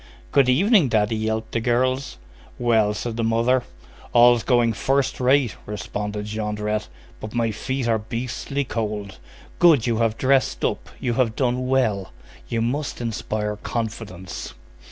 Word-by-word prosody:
"Good 135 -3 +4
evening, 180 - +4
daddy," 110 -1 +2
yelped 110 0 -2
the 115 - 0
girls. 125 - 0 0.4
"Well?" 110 -4 +2
said 115 +1 -4
the 115 - 0
mother. 115 +3 +2 0.5
"All's 120 0 +6
going 120 -2 +2
first 135 +6 0
rate," 130 -1 +3
responded 105 +1 -4
Jondrette, 105 0 -2 0.3
"but 110 +2 -7
my 115 -1 +1
feet 130 +3 -3
are 115 -1 +2
beastly 125 +5 -3
cold. 105 - -4 0.4
Good! 160 -9 +6
You 115 -2 +1
have 115 -1 +1
dressed 135 0 +2
up. - - -2
You 120 - -1
have 115 -2 +1
done 125 -1 0
well! 110 -8 +1 0.4
You 115 -1 0
must 140 +5 -2
inspire 110 -2 -3
confidence." 105 -5 -5
115 Hz, 140 wpm, -23 LUFS, 105-130 Hz, 0.5 s, All's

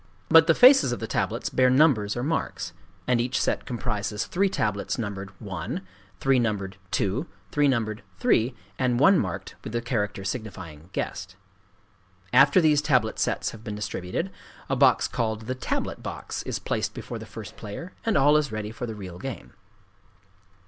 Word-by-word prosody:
But 160 0 +7
the 165 - +5
faces 255 - +7
of 120 - -2
the 115 - -3
tablets 110 0 -1
bear 130 -1 +4
numbers 125 -7 +3
or 120 - -2
marks; 160 +4 -2 0.3
and 125 -2 +2
each 125 +2 0
set - - -1
comprises 105 -4 -2
three 195 +2 +1
tablets 105 - -1
numbered 100 -4 -4
"1," 95 -3 -4 0.4
three 135 -1 +3
numbered 100 -5 -1
"2," 105 - 0 0.2
three 145 -1 +3
numbered 115 -5 0 0.2
"3," 115 +5 +2 0.2
and 125 -2 +2
one 190 +7 +6
marked 90 -4 -4
with 110 - -7
the 120 - +1
character 105 -5 -2
signifying 95 - -6
"guest." 95 -1 -4 1.0
After 140 +6 +7
these 155 -3 +4
tablet 130 -7 +1
sets - - 0
have 110 -1 -12
been 105 -2 -5
distributed, 105 - -3 0.4
a 135 - +2
box 130 -1 +4
called 110 -2 -2
the 120 +3 -3
"tablet 130 - -3
box" - - -5
is - - -1
placed - - -2
before - - -6
the - - -9
first - - -9
player; 165 - -8
and 225 - +2
all 145 +2 +5
is 150 -4 0
ready 110 -1 -4
for 120 +2 -5
the 110 - -5
real 90 -4 -8
game. 135 +5 -7
120 Hz, 170 wpm, -26 LUFS, 105-135 Hz, 1.0 s, But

